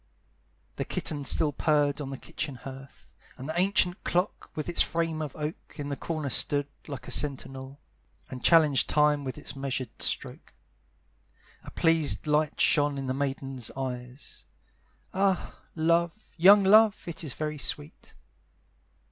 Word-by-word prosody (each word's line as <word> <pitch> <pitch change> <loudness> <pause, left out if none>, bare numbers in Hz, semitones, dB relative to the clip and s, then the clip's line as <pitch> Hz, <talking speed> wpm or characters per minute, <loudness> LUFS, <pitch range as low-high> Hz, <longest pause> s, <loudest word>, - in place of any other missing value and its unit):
The - - -1
kitten 145 -3 -4
still 150 +3 +3
purred 145 0 +1
on 135 - -5
the 135 - -6
kitchen 140 +1 -5
hearth, 135 +2 -12 0.2
And 130 - -7
the 160 - -3
ancient 185 -1 +2
clock, 180 +3 -1
with 155 - -4
its 175 - +3
frame 165 -1 0
of 150 -4 -5
oak, 150 +2 -6
In 145 -1 -5
the 140 - -2
corner 155 -2 -4
stood, 145 +3 +4 0.2
like 140 -3 -7
a - - -5
sentinel, 135 -1 -2 0.5
And 125 -2 -9
challenged 155 -5 +5
time 150 -1 +3
with 130 -3 -5
its 120 - -7
measured 135 -3 -4
stroke. - - -2 1.1
A - - -9
pleased 165 -3 +2
light 150 0 +1
shone 145 -2 +4
in 135 - -4
the 130 - -1
maiden's 135 -2 -3
eyes; 125 0 -6 0.7
Ah, 190 -1 0 0.2
love, 170 +5 0
young 195 +4 +7
love, 215 +2 +5
it 170 0 -5
is 145 -6 -4
very 155 -1 -4
sweet! 145 +2 -4
150 Hz, 145 wpm, -28 LUFS, 135-165 Hz, 1.1 s, young